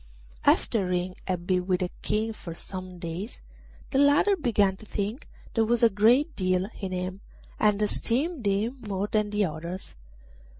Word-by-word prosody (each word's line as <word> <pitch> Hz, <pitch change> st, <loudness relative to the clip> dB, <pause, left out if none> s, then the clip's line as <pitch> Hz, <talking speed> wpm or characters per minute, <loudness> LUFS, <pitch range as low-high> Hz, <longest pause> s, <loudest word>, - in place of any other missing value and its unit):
After 200 Hz, -5 st, +3 dB
Ring 180 Hz, 0 st, -1 dB
had 180 Hz, -2 st, -2 dB
been 180 Hz, 0 st, +1 dB
with 185 Hz, -1 st, +1 dB
the 180 Hz, -, -1 dB
King 220 Hz, +1 st, 0 dB
for 170 Hz, -5 st, -8 dB
some 185 Hz, 0 st, -7 dB
days 170 Hz, +6 st, -5 dB, 0.5 s
the 270 Hz, -, +2 dB
latter 285 Hz, +8 st, +5 dB
began 215 Hz, -, +2 dB
to 215 Hz, -, -13 dB
think 210 Hz, +8 st, -3 dB, 0.3 s
there 225 Hz, -, +3 dB
was 235 Hz, +1 st, +1 dB
a 230 Hz, -, +7 dB
great 245 Hz, +10 st, +4 dB
deal 185 Hz, 0 st, +1 dB
in 195 Hz, -2 st, -4 dB
him, 185 Hz, +1 st, -3 dB, 0.4 s
and 210 Hz, -1 st, +3 dB
esteemed 255 Hz, +8 st, 0 dB
him 210 Hz, +6 st, 0 dB
more 200 Hz, -2 st, -2 dB
than 210 Hz, 0 st, 0 dB
the 205 Hz, 0 st, +2 dB
others. 170 Hz, +3 st, -6 dB
205 Hz, 165 wpm, -27 LUFS, 185-230 Hz, 0.5 s, a